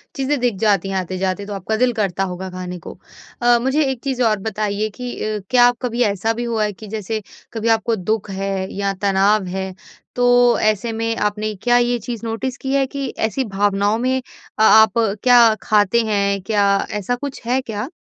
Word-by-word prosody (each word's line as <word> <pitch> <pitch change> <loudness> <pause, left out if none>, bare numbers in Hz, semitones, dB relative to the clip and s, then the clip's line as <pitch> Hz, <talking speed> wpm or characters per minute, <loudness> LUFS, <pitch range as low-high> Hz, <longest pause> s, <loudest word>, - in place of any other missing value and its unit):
चीज़ें 275 +1 -1
दिख 245 -3 0
जाती 200 -3 +2
हैं 195 - -3
आते-जाते 185 +2 -2
तो 205 - -6
आपका 200 +3 -2
दिल 250 +2 +3
करता 195 -4 -1
होगा 185 0 -5
खाने 180 0 -6
को। - - -10 0.4
अ, 240 0 +5
मुझे 265 +5 +1
एक 255 -3 -6
चीज़ 260 -2 -2
और 215 -3 +2
बताइए 215 0 -2
कि 245 +4 -7
अ, 215 0 -2
क्या 245 -1 +6
आप 245 0 +1
कभी 245 -1 -2
ऐसा 210 +1 0
भी 240 +1 -4
हुआ 230 -2 -1
है 210 -1 -1
कि 215 +3 -12
जैसे 215 +1 -4 0.3
कभी 225 0 -3
आपको 225 +1 +2
दुःख 210 +2 -2
है 195 0 -3
या 200 0 -1
तनाव 200 +1 +2
है 190 +1 -4 0.4
तो 245 0 +4
ऐसे 215 +1 +1
में 225 0 -2
आपने 210 +1 -1
क्या 245 0 +4
ये 240 0 +2
चीज़ 235 +1 -6
नोटिस 235 +3 -3
की 265 0 -3
है 275 -1 +3
कि 275 0 -4
ऐसी 225 +5 -1
भावनाओं 205 +1 +1
में 255 +2 0
अ 250 -3 -10
आप 220 0 +6 0.3
क्या 240 -3 +6
खाते 210 +2 +3
हैं? 200 -2 0
क्या 200 0 +1
ऐसा 210 +4 -1
कुछ 275 +2 -7
है 255 +3 +1
क्या? 220 0 -5
220 Hz, 200 wpm, -19 LUFS, 200-240 Hz, 0.4 s, क्या